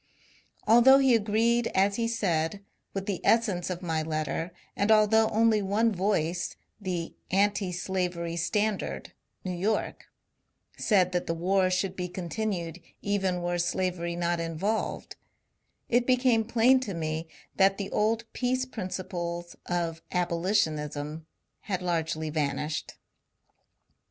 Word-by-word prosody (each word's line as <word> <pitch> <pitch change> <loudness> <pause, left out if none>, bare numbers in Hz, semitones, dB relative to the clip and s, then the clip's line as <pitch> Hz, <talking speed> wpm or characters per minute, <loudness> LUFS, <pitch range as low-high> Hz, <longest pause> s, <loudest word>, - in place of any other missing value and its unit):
Although 240 +5 +7
he 270 -2 +4
agreed, 230 +2 +2
as 200 +1 +3
he 230 -1 0
said, 200 -4 -1 0.3
with 195 -1 -4
the 195 -3 -3
essence 205 -7 +2
of 180 0 -4
my 160 -2 0
letter, 155 +2 -2 0.2
and 200 - 0
although 220 +1 +5
only 220 -1 +3
one 210 +3 +2
voice 175 -3 0 0.3
(the 180 -4 -3
" - - -21
Anti 205 -2 -1
Slavery 175 -1 -2
Standard," 205 +5 -1 0.3
New 185 - -3
York) 205 +5 -1 0.7
said 185 -4 +2
that 180 -1 -1
the 165 - -1
war 185 +2 +2
should 185 +1 -1
be 180 -1 -3
continued 180 -1 -4 0.2
even 190 -3 0
were 175 0 -1
slavery 175 -1 -1
not 175 0 0
involved, 165 +7 -2 0.7
it 245 +1 +2
became 250 -3 +3
plain 240 +3 +4
to 210 -8 -4
me 160 0 -3 0.3
that 195 0 +4
the 200 -1 -4
old 225 +2 +1
peace 255 +1 0
principles 175 -6 -5
of 170 -2 -2
abolition 175 -2 +1
ism 150 +1 -6 0.3
had 185 -3 -3
largely 160 -3 -1
vanished. 150 0 -2
185 Hz, 130 wpm, -28 LUFS, 170-215 Hz, 0.7 s, Although